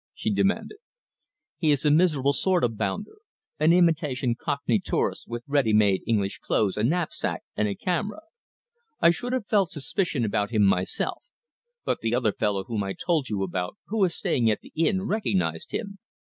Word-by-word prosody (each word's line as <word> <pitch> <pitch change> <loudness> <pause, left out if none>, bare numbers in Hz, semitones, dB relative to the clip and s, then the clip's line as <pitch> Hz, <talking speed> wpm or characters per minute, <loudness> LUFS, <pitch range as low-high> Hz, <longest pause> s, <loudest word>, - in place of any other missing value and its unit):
she - - -1
demanded. 415 - 0 0.8
"He 160 - +2
is 145 0 +2
a 150 - +5
miserable 150 -4 +3
sort 185 +3 +1
of 115 -2 +1
bounder 110 - -3 0.4
an 155 +2 +5
imitation 155 -8 +2
cockney 125 -2 -1
tourist, - - -2
with 120 0 -5
ready 140 -6 +2
made 100 -3 +4
English 100 -4 0
clothes, 100 -3 0
a 105 - -1
knapsack, 165 +7 -1
and 105 - +1
a 100 - -2
camera. 185 - -2 0.8
I 170 - +6
should 245 +8 -4
have 255 -5 -1
felt 200 -4 +2
suspicious 155 - -1
about 105 -1 0
him 110 -3 +2
myself, 95 -2 +1 0.6
but - - 0
the 115 +1 0
other 120 -4 +2
fellow 100 -2 -1
whom 105 0 -3
I 95 0 -3
told 160 - -1
you 100 -3 -1
about, 90 -1 -3
who 215 -1 +1
is 175 -3 +1
staying 130 - +1
at 105 - 0
the - - -15
inn, 185 +4 +1
recognized 95 - -1
him. 200 -3 -5
135 Hz, 175 wpm, -26 LUFS, 105-175 Hz, 0.8 s, I